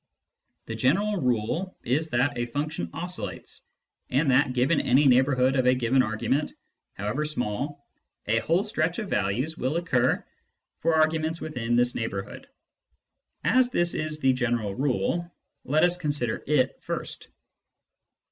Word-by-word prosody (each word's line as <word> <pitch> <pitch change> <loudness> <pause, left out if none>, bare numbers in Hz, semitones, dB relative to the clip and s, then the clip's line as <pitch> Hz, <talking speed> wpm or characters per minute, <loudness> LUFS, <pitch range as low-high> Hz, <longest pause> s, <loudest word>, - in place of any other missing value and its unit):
The 115 - -5
general 190 - +1
rule 125 - -1
is 155 +6 0
that 130 +1 +1
a 120 0 -2
function 150 +5 -3
oscillates, 160 - -6 0.5
and 135 +2 +2
that, 130 0 +3
given 130 +5 +2
any 135 +4 +3
neighbourhood 130 0 +4
of 130 -2 +2
a 125 - +5
given 125 +1 +2
argument, 130 +6 -1 0.4
however 105 +9 -2
small, 145 0 -3 0.4
a 115 +2 +2
whole 170 - +1
stretch 175 -5 -1
of 215 -4 -5
values 115 +11 -1
will 130 +6 0
occur 130 -7 +1 0.5
for 165 - +2
arguments 160 +1 +1
within 120 -6 -2
this 120 0 +3
neighbourhood. 100 -4 -5 1.0
As 245 +10 +4
this 175 -7 +1
is 155 0 -2
the 130 -2 +3
general 120 -5 -1
rule, 140 - -1 0.3
let 150 +3 +2
us 175 0 +3
consider 145 -8 -1
it 135 -3 +1
first. - - -5
135 Hz, 140 wpm, -26 LUFS, 120-160 Hz, 1.0 s, a